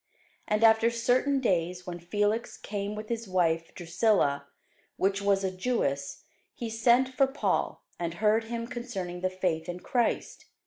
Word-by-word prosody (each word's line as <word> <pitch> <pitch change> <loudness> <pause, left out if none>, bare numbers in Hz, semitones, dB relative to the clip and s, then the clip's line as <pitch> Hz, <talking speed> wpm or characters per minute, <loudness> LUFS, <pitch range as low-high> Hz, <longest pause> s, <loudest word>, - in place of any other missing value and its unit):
And 210 +1 +1
after 225 +1 +6
certain 245 +4 +2
days, 180 -6 0
when 175 -1 -6
Felix 205 +6 -1
came 205 0 -4
with 215 0 -6
his 230 -1 -3
wife 165 -3 +1
Drusilla, 170 -6 +1 0.5
which 195 +1 +1
was 200 -1 +2
a 190 - 0
Jewess, 160 - -1 0.3
he 230 -2 -5
sent 240 +3 +4
for 265 +1 +2
Paul, 270 +2 -1 0.2
and 170 -1 -3
heard 215 +3 +2
him 230 0 -4
concerning 225 -8 -5
the 185 - +1
faith 180 -3 -2
in 175 0 -5
Christ. 240 +4 -1
205 Hz, 150 wpm, -29 LUFS, 175-230 Hz, 0.5 s, after